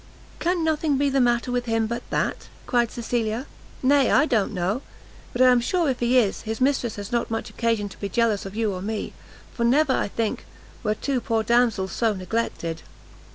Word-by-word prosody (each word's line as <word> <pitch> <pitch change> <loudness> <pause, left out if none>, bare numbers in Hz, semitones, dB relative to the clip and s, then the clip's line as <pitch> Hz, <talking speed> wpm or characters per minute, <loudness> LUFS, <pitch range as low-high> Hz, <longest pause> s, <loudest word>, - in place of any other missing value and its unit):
"Can 350 -1 0
nothing 310 -2 +1
be 280 0 +1
the 270 0 +3
matter 240 0 +2
with 245 0 -1
him 225 -1 +1
but 235 +2 -3
that?" - - -1 0.2
cried 240 -2 +2
Cecilia. 235 0 -2 0.4
"Nay, 275 0 +4
I 290 - +5
don't 225 -9 +1
know; 190 +6 -1 0.5
but 250 - +2
I 255 - +7
am 250 - +5
sure 340 +6 +1
if 255 - -5
he 240 +2 +3
is, 215 -6 +2
his 220 0 -4
Mistress 255 -4 +1
has 205 0 -7
not 235 -1 0
much 225 0 -3
occasion 230 -3 0
to - - -14
be 200 - -2
jealous 225 -1 +1
of 195 +1 -8
you 220 -2 0
or 185 - -5
me, 215 +2 -4 0.4
for 235 - -2
never, 265 +4 +3
I - - 0
think, 220 +2 -2 0.4
were 215 -2 0
two 265 +2 -1
poor 225 -1 0
Damsels 225 -5 +2
so 225 +2 +1
neglected!" 185 -4 -3
235 Hz, 200 wpm, -24 LUFS, 215-255 Hz, 0.5 s, I